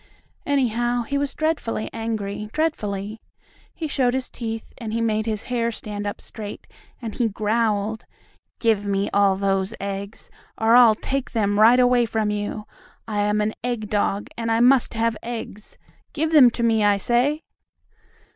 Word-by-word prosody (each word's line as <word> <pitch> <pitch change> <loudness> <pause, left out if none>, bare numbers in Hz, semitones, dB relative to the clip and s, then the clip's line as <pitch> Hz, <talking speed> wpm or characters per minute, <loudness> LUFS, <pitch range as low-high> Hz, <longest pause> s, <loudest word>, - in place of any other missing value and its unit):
Anyhow, 240 -3 +1
he 280 +4 -4
was 285 -1 -2
dreadfully 310 -9 -1
angry, 215 -2 -4
dreadfully! 215 -9 -2 0.5
He 325 - -5
showed 260 -4 +1
his 260 -1 -2
teeth, 225 -2 -6
and 220 -3 -5
he 230 - 0
made 220 -1 0
his 215 -1 -2
hair 235 -2 -1
stand 205 -2 -6
up 205 - -4
straight, 210 -2 -8 0.4
and 225 -2 -4
he 240 - +1
growled: 215 0 -1 0.5
"Give 220 -3 +2
me 200 0 -1
all 200 -1 +4
those 195 +2 0
eggs, 200 +1 -6 0.3
or 225 +1 +4
I'll 240 -3 +7
take 270 +4 -3
them 205 -3 +1
right 230 +4 +7
away 245 -1 +4
from 220 -2 0
you! 210 +1 -3 0.4
I 210 -2 -2
am 210 +1 +1
an 215 +1 0
egg 235 -4 -3
dog, 205 -1 0
and 230 -1 -2
I 225 - +2
must 250 0 +4
have 230 0 +1
eggs. 225 -3 -7 0.4
Give 315 +1 -1
them 285 -6 +8
to 235 0 -4
me, 225 -2 +3
I 205 -1 +4
say!" 250 +9 +1
225 Hz, 165 wpm, -23 LUFS, 210-240 Hz, 0.5 s, them